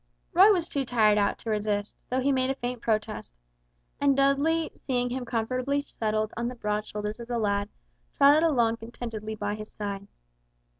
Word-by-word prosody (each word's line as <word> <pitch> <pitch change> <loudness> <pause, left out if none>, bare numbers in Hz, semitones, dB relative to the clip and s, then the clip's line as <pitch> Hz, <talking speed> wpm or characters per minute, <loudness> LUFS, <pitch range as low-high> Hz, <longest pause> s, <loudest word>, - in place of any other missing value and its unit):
Roy 385 +4 +8
was 350 -5 +1
too 280 - -1
tired 220 -4 +3
out 200 - +1
to 225 - -4
resist, 210 -1 -2
though 255 +1 0
he 280 +2 +2
made 260 -1 +1
a 270 - 0
faint 245 -2 -4
protest, 215 - -2 0.6
and 280 -1 +3
Dudley 285 +4 +2
seeing 245 -2 -2
him 255 0 -3
comfortably 255 +4 -1
settled 215 -5 -2
on 235 +1 -2
the 250 - -5
broad 210 -2 -2
shoulders 210 +1 -4
of 235 - -8
the 240 -1 -2
lad, 200 -2 0 0.5
trotted 290 +2 +6
along 240 -8 +2
contentedly 225 -2 -6
by 205 -1 -2
his 215 0 -7
side. 200 -1 -5
235 Hz, 180 wpm, -27 LUFS, 215-270 Hz, 0.6 s, Roy